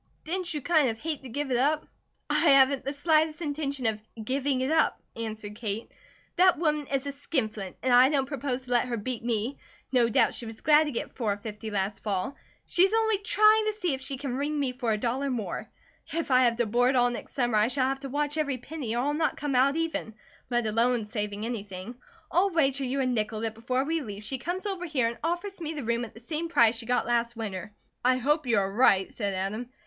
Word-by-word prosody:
"Didn't 360 +2 -2
you 300 -3 -3
kind 310 -5 +3
of 225 - -3
hate 310 +1 -3
to 265 - -9
give 285 +3 -3
it 245 - +2
up?" 295 +5 +1 0.4
"I - - -1
haven't 275 -3 +5
the 275 - -2
slightest 310 +1 +2
intention 285 -4 -3
of 215 -1 0 0.2
giving 265 +1 0
it 260 +3 0
up," 320 0 +2 0.2
answered 215 -2 -5
Kate. 215 -1 -4 0.5
"That 365 0 +5
woman 300 -3 0
is 275 0 -1
a 280 - -2
skin 275 -4 -1
flint 200 -3 -8
and 255 -1 +2
I 250 +2 +7
don't 280 -3 +1
propose 265 -2 -3
to 250 - -11
let 245 0 +3
her 240 -1 -2
beat 230 +2 -4
me. 235 +3 -1 0.3
No 245 -3 +3
doubt - - +3
she 235 - -2
was 225 0 -9
glad 305 0 +5
to 295 - -3
get 235 - -4
four 210 -5 -1
fifty 215 +1 -7
last 200 0 -2
fall. 200 +4 -2 0.3
She's 375 +3 +3
only 445 -2 +2
trying 430 +1 +4
to 430 - 0
see 360 -7 -1
if 265 - -4
she 270 0 -4
can 265 -2 -4
wring 295 +2 -1
me 270 -3 0
for 245 -3 -1
a 215 - +1
dollar 255 +5 -1
more. 220 -8 -4 0.4
If 330 -3 -2
I 255 0 +6
have 235 -1 +3
to 240 0 +1
board 245 +4 +2
all 245 -1 +4
next 240 - -7
summer, 240 -4 +1
I 210 - +4
shall 255 +1 +1
have 270 0 -1
to 275 -1 -7
watch 295 +2 -1
every 285 -4 0
penny, 255 -3 -5
or 240 - +1
I'll 290 +2 0
not 310 0 0
come 290 -2 -2
out 265 +3 +4
even, 325 -9 -2 0.3
let 240 -2 +1
alone 230 +1 +2
saving 210 0 -3
anything. 205 -2 -5 0.4
I'll 370 +4 +3
wager 275 -6 +1
you 270 +2 -1
a - - +1
nickel 220 -3 -1
that 225 -1 -2
before 255 +4 -1
we 325 +3 -1
leave, 205 -5 -7
she 260 +5 -3
comes 355 - -3
over 380 -3 -3
here 265 -7 +1
and 235 - -8
offers 350 +3 -3
me 320 -1 -3
the 295 -3 -5
room 235 +1 0
at 220 - -14
the - - -11
same 320 +6 -3
price 235 -7 +4
she 225 0 -8
got 250 0 +1
last 235 0 0
winter." 205 -3 -5 0.3
"I 255 +1 +4
hope 295 +3 +1
you 230 -3 +3
are 195 -1 +1
right," 200 -5 +4
said 200 -4 -3
Adam. 210 +6 -3
255 Hz, 235 wpm, -28 LUFS, 230-295 Hz, 0.5 s, I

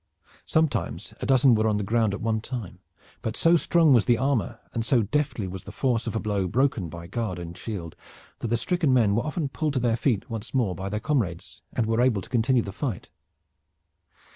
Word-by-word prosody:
Sometimes 160 -1 0
a - - -2
dozen 130 -1 +5
were 110 0 +2
on 105 -1 +2
the 105 - -1
ground 110 0 +1
at - - -8
one 110 -1 0
time, 115 -5 -6 0.4
but 110 +1 -3
so 165 +1 +5
strong 165 -2 +4
was 120 -4 +4
the 120 -2 +4
armor, 130 -8 0
and 115 - -1
so 120 -1 +3
deftly 120 -3 -1
was 95 0 -7
the 100 - -8
force 120 +2 0
of - - -3
a - - +1
blow 100 -3 -1
broken 120 -4 +1
by 85 +1 -8
guard 95 0 -3
and 85 0 -7
shield, 90 -4 -6 0.4
that - - -3
the 120 +1 +1
stricken 160 -1 +1
men 110 -5 +4
were 115 - +2
often 155 0 -2
pulled 150 +2 -2
to 130 - +1
their 120 -2 +2
feet 115 -3 0
once 115 +2 -6
more 115 -8 +2
by 95 +3 -5
their 105 +1 -2
comrades, 110 - -2
and 115 - 0
were 115 +2 +1
able 120 -6 +2
to - - -13
continue 120 0 +2
the 100 - -6
fight. 110 - -4
115 Hz, 215 wpm, -26 LUFS, 100-130 Hz, 0.4 s, dozen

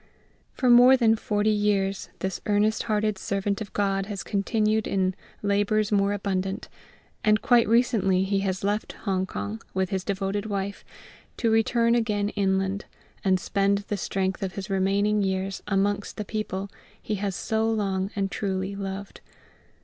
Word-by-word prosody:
For 255 - 0
more 245 +2 +8
than 225 -3 +4
forty 210 0 0
years 200 -2 0
this 190 0 -3
earnest 210 +1 +2
hearted 210 -2 +1
servant 200 +1 -1
of 210 -1 -6
GOD 195 -1 0
has 200 -3 -5
continued 215 +1 0
in 190 -1 +1 0.3
"labours 205 +1 +1
more 200 -1 +3
abundant"; 195 -1 -2 0.5
and 215 0 +4
quite 240 -2 +4
recently 220 -5 +3
he 195 0 0
has 190 -1 -2
left 205 +2 -1
Hong 190 -2 0
kong, 100 - -5
with 190 0 0
his 190 -2 -1
devoted 200 +1 -2
wife, 200 -1 -3 0.5
to 230 -2 +1
return 230 +1 +3
again 210 -3 +1
inland, 195 -1 0 0.4
and 190 -2 +3
spend 200 +1 +1
the 205 - 0
strength 190 0 -2
of 190 -1 -3
his 195 +1 -6
remaining 200 +2 +2
years 190 0 -1
amongst 205 0 0
the 210 - -3
people 200 -2 -4 0.3
he 215 - -4
has 200 -3 -1
so 220 0 0
long 195 -3 0
and 195 -1 -1
truly 190 -1 -2
loved. 195 0 -6
200 Hz, 155 wpm, -26 LUFS, 195-215 Hz, 0.5 s, more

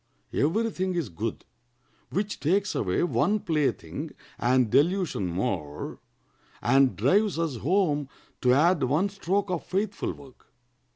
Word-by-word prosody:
Every 220 +10 +1
thing 185 -1 -2
is 165 -9 -1
good 105 +6 -4 0.6
which 205 +2 -2
takes 195 +6 +1
away 90 - 0
one 205 +4 +2
plaything 155 -8 -1 0.3
and 125 0 +3
delusion 170 - +2
more, 85 -5 -3 0.6
and 135 +2 +3
drives 205 -2 +2
us 165 -6 -1
home 150 - +1 0.3
to 125 - +4
add 160 +5 +4
one 150 +10 +2
stroke 195 0 -1
of 175 - -2
faithful 200 +1 -2
work." 135 -3 -17
165 Hz, 125 wpm, -27 LUFS, 130-195 Hz, 0.6 s, to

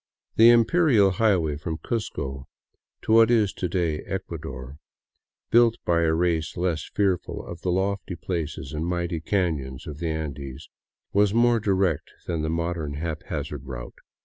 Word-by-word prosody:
The 115 +1 +8
imperial 120 - +5
highway 90 -7 +2
from 80 +1 -4
Cuzco 70 - -4 0.6
to - - -1
what 115 0 +7
is 110 -5 +3
to 90 - -3
day 85 -4 0
Ecuador, 75 -7 -6 0.7
built 115 -1 +5
by 85 -1 +3
a 80 -1 +2
race 85 -2 0
less 85 -3 -1
fearful 95 -4 0
of 85 -1 -8
the 90 - -2
lofty 95 0 -1
places 85 -3 -4
and 75 +1 -2
mighty 85 -1 -1
canons 80 -8 -1
of 75 0 -7
the 85 -1 -2
Andes, 70 -3 -5 0.4
was 100 +1 +3
more 120 0 +4
direct 95 -6 0
than 85 -2 -2
the 80 - -1
modern 85 -3 -2
haphazard 75 -3 -4
route. - - -8
85 Hz, 145 wpm, -25 LUFS, 75-100 Hz, 0.7 s, The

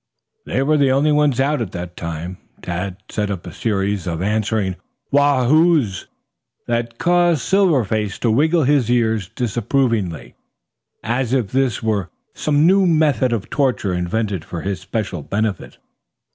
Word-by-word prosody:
They 135 - 0
were 155 +2 +2
the 140 -2 +3
only 140 +3 +3
ones 150 -3 +2
out 140 0 +1
at 110 - -4
that 90 0 -6
time. 85 +2 -6 0.2
Tad 90 +1 -4
set 105 -1 -2
up 95 -4 -5
a 90 - -8
series 100 -3 -1
of 85 -2 -2
answering 105 -1 -1 0.3
"woos 140 -3 +3
hoos" 155 - +3 0.6
that 115 0 -2
caused 175 -4 +2
Silver 185 -6 +3
Face 105 0 -2
to 115 - +1
wiggle 155 +7 +3
his 135 -4 +2
ears 110 -5 +1
disapprovingly, 115 - -1 0.7
as 120 +3 -1
if 125 -7 +1
this 130 -4 0
were 105 -5 -1 0.2
some 150 0 +1
new 190 +1 +4
method 150 -7 +2
of 110 -5 -3
torture 130 -9 0
invented 95 +1 -2
for 85 0 -6
his 95 -3 -2
special 95 -3 -3
benefit. 105 +5 -3
115 Hz, 150 wpm, -20 LUFS, 95-140 Hz, 0.7 s, new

